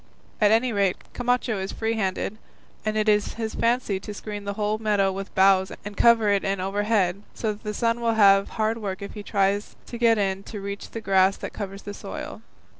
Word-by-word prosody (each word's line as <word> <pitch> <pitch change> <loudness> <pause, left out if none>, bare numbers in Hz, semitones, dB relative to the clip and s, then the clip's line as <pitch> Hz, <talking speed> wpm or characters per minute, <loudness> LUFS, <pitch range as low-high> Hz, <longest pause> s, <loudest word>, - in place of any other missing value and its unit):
At 210 - +6
any 230 +3 +3
rate, 200 -3 +1 0.2
Camacho 245 -3 0
is 190 0 -3
free 225 0 -1
handed, 200 0 -2 0.4
and 215 0 -1
it 215 0 +1
is 210 -1 +2
his 225 -1 -3
fancy 230 -4 0
to 205 +2 -8
screen 205 -1 -6
the 200 - -2
whole 210 +1 -1
meadow 205 -3 +2
with 195 +1 -7
boughs 190 0 +4
and 205 0 -6
cover 230 -2 +5
it 200 -1 +2
in 195 -1 -1
overhead, 200 -1 0
so 220 -2 -1
that 205 - -14
the 210 - -4
sun 230 +2 0
will 230 -1 +1
have 195 -2 +5
hard 220 +1 0
work 200 -2 -4
if 200 - -7
he 210 - -7
tries 200 0 0
to 235 - -8
get 230 -2 +4
in 195 -1 0
to 210 - -7
reach 200 0 -6
the 225 - -6
grass 190 -1 +3
that - - -7
covers 195 -1 -6
the 205 - -6
soil. - - -7
205 Hz, 215 wpm, -25 LUFS, 195-220 Hz, 0.4 s, At